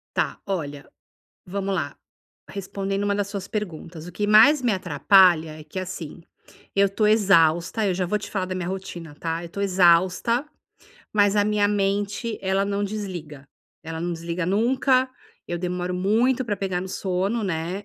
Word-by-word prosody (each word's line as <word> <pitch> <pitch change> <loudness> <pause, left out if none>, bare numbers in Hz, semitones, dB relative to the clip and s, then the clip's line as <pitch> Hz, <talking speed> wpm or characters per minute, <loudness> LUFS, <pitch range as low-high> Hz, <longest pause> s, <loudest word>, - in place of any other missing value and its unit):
Tá, - - -1
olha 145 -8 -4 0.6
vamo 195 +1 -3
lá. 160 -6 -2 0.5
Respondendo 195 0 -3
uma 205 0 +1
das 205 -1 -1
suas 200 -1 -6
perguntas, 175 -5 -6
o - - -8
que 205 +4 -2
mais 230 +8 +7
me 245 -3 +2
atrapalha 175 -2 +4
é - - -11
que, 155 +5 -6
assim, 180 -3 -7 0.5
eu 200 0 +4
tô 210 +2 +1
exausta, 190 -1 +3
eu 190 - +1
já 180 0 -1
vou 210 +4 0
te 205 - -8
falar 190 -3 -2
da 185 0 -4
minha 180 -2 -3
rotina, 175 -5 -6
tá, 165 +2 -3
eu 170 - -8
tô 200 - -5
exausta, 185 - +3 0.7
mas 205 -1 +3
a 205 - +3
minha 210 -1 +2
mente 205 +2 -1
ela 195 +1 +1
não 200 0 -1
desliga, 180 -9 -6 0.4
ela 160 0 -5
não 175 +1 -2
desliga 170 +1 -3
nunca, 255 +6 +2 0.4
eu 175 - -2
demoro 180 0 -3
muito 225 +8 +2
pra 210 -3 -1
pegar 185 -2 -2
no 190 - -6
sono, 195 +5 -1
né. 180 +2 -3
190 Hz, 170 wpm, -24 LUFS, 175-205 Hz, 0.7 s, mais